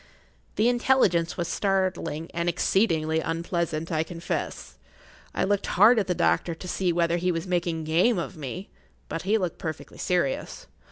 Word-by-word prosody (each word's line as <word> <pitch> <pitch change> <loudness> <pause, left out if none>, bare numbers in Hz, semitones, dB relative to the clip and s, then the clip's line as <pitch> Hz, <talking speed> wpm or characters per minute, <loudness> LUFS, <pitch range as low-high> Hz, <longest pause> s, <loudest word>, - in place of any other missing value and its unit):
The 215 +3 +3
intelligence 240 -9 +2
was 175 -2 -1
startling 185 -5 -1
and 170 0 0
exceedingly 165 -3 +1
unpleasant, 165 0 -2
I 155 -1 +1
confess. 165 +1 -5 0.6
I - - +1
looked 200 0 0
hard 220 +5 +7
at 200 - -1
the 180 - 0
doctor 170 0 +1
to 180 - -9
see 180 0 0
whether 170 0 +1
he 180 +1 +1
was 165 0 -3
making 175 -3 -1
game 175 +9 +3
of 170 - -4
me, 155 +6 -6 0.4
but 165 - -3
he 205 +5 +2
looked 180 -5 -3
perfectly 160 -1 -6
serious. 175 -7 -1
175 Hz, 160 wpm, -26 LUFS, 165-190 Hz, 0.6 s, hard